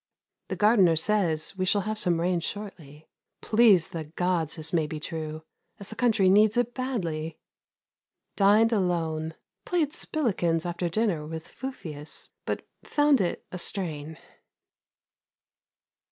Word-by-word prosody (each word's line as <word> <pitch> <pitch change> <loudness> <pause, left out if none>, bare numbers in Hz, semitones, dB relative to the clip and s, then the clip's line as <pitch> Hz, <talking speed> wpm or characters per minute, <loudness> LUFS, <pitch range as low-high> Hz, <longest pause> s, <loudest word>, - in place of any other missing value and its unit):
The - - -3
gardener 205 -6 +4
says 165 -2 +1
we 185 - +1
shall 200 +2 +2
have 215 +1 -3
some 175 -5 +2
rain 175 +1 +1
shortly. 165 -6 -7 0.3
Please 215 -7 +4
the 160 -2 -5
Gods 165 0 -1
this 160 0 -4
may 160 -3 +2
be 155 0 -5
true, 155 0 -5 0.4
as 200 - -8
the 220 - -8
country 225 -6 +3
needs 210 +4 +5
it 245 0 +1
badly! 170 -12 -3 1.0
Dined 215 +3 +4
alone. 165 -5 -1 0.3
Played 320 -5 0
spilikins 185 - 0
after 175 0 -2
dinner 175 -6 0
with 160 +1 -7
Fufius, 175 - -4 0.2
but - - -3 0.2
found 290 -5 +3
it 175 - -2
a 180 - -6
strain. 160 -5 -3
180 Hz, 130 wpm, -27 LUFS, 160-215 Hz, 1.0 s, needs